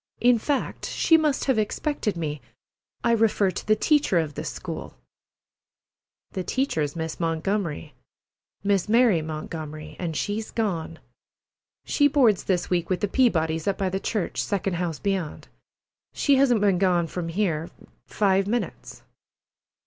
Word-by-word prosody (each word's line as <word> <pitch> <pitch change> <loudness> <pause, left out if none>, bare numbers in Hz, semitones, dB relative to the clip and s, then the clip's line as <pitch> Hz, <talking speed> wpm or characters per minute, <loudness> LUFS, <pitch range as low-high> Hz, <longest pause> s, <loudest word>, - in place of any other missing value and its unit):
In 245 -1 +4
fact, 280 +4 -2
she 325 - +3
must 305 -3 +2
have 265 -5 +2
expected 215 - -1
me. 150 -3 -3 0.6
I 235 - +3
refer 215 -4 +3
to - - -7
the 215 - +5
teacher 290 - +2
of 160 -3 0
this - - -4
school." - - -7 1.4
"The 185 - -3
teacher's 160 - -1
Miss 160 -1 -4
Montgomery—Miss 175 +3 -3
Mary 230 -7 +4
Montgomery—an' 155 +1 -6
she's 205 +7 -2
gone. 170 -7 -2 0.9
She 290 - +3
boards 255 - +3
this 180 -3 0
week 175 -2 0
with 185 - 0
the 205 - +1
Peabodys', 165 - +1
up 200 - +1
by 190 -1 0
the 190 +1 -2
church, 205 -2 -2
second 195 -3 -1
house 170 -3 -2
beyond. 195 -6 -3 0.6
She 280 -2 +3
hasn't 250 -5 +4
been 195 -3 +3
gone 180 -3 +3
from 165 +1 -4
here 165 -3 -1 0.4
five 195 -1 +2
minutes." 235 +3 -4
195 Hz, 135 wpm, -25 LUFS, 165-220 Hz, 1.4 s, the